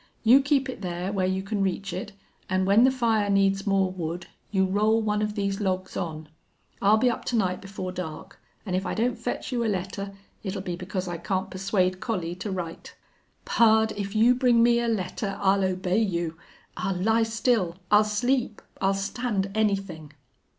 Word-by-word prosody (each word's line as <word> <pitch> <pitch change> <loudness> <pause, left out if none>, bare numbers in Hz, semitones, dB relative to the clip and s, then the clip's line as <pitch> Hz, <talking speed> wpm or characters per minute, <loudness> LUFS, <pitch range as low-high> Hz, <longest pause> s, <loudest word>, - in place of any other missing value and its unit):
You 250 +4 +7
keep 280 -1 +1
it 255 - -6
there, 180 0 -3
where 190 -2 +1
you 190 0 -1
can 200 0 -2
reach 195 0 -1
it, 190 +3 -5 0.4
an' 185 0 +1
when 205 +5 +6
the - - +6
fire 225 -5 +1
needs 195 0 +2
more 195 -1 +2
wood 175 -1 -4 0.2
you 190 -2 +2
roll 210 +4 +2
one 210 -1 0
of 210 0 -2
these 200 0 -1
logs 185 -1 -2
on. 160 -4 -4 0.5
I'll 205 +2 +5
be 250 - +3
up - - -5
to 245 - -1
night 185 -4 0
before 190 -1 -6
dark, 185 +1 -7 0.3
an' 185 - -3
if 185 +1 0
I - - -3
don't 235 +2 +1
fetch - - -4
you 240 -2 0
a - - 0
letter 195 +1 -3 0.3
it'll 195 -1 -4
be 180 -3 -3
because 185 +1 -4
I 175 -1 -3
can't 190 +2 -2
persuade 185 -1 0
Collie 180 -8 -2
to 205 - -5
write." 175 -4 -6 0.5
"Pard, 220 -1 +4
if 200 0 -4
you 230 +3 +6
bring 245 -2 +4
me 235 0 +4
a 235 - -1
letter 195 -1 -2
I'll 195 0 +3
obey 185 +1 0
you 170 -6 -1 0.4
I'll 190 +1 -2
lie 220 +5 +2
still 225 -5 +1 0.2
I'll 210 +1 +7
sleep 235 +2 0 0.2
I'll 195 0 +2
stand 200 0 -2
anything." 195 -8 -1
195 Hz, 190 wpm, -26 LUFS, 185-220 Hz, 0.5 s, You